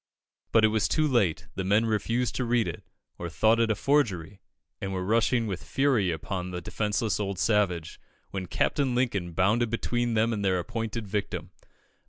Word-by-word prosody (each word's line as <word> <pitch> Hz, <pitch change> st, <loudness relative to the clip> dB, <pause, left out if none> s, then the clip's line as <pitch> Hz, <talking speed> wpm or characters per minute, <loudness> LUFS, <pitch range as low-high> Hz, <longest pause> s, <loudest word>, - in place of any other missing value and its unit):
But 110 Hz, -1 st, +5 dB
it -, -, +4 dB
was 110 Hz, -1 st, +1 dB
too 155 Hz, -1 st, +2 dB
late; 105 Hz, -, +1 dB
the 95 Hz, -, -3 dB
men 105 Hz, +4 st, +3 dB
refused 115 Hz, +2 st, 0 dB
to 130 Hz, -, 0 dB
read 120 Hz, -1 st, +1 dB
it, -, -, -6 dB, 0.4 s
or 85 Hz, -, -4 dB
thought 110 Hz, +9 st, +3 dB
it 115 Hz, -1 st, +2 dB
a 110 Hz, -, +2 dB
forgery, 100 Hz, -, 0 dB, 0.4 s
and 95 Hz, -, -3 dB
were 95 Hz, -1 st, -2 dB
rushing 115 Hz, +3 st, +2 dB
with 95 Hz, -4 st, -4 dB
fury 135 Hz, -9 st, +2 dB
upon 90 Hz, +3 st, -3 dB
the 90 Hz, -1 st, -4 dB
defenceless 105 Hz, +4 st, -1 dB
old 100 Hz, -2 st, -2 dB
savage, 90 Hz, -6 st, 0 dB, 0.3 s
when 95 Hz, -2 st, -4 dB
Captain 130 Hz, +6 st, 0 dB
Lincoln 100 Hz, -9 st, 0 dB
bounded 105 Hz, +7 st, +2 dB
between 120 Hz, +1 st, -1 dB
them 115 Hz, +2 st, +2 dB
and 105 Hz, -2 st, -2 dB
their 95 Hz, -2 st, +2 dB
appointed 115 Hz, +3 st, -3 dB
victim. 100 Hz, 0 st, -3 dB
105 Hz, 180 wpm, -27 LUFS, 95-115 Hz, 0.4 s, But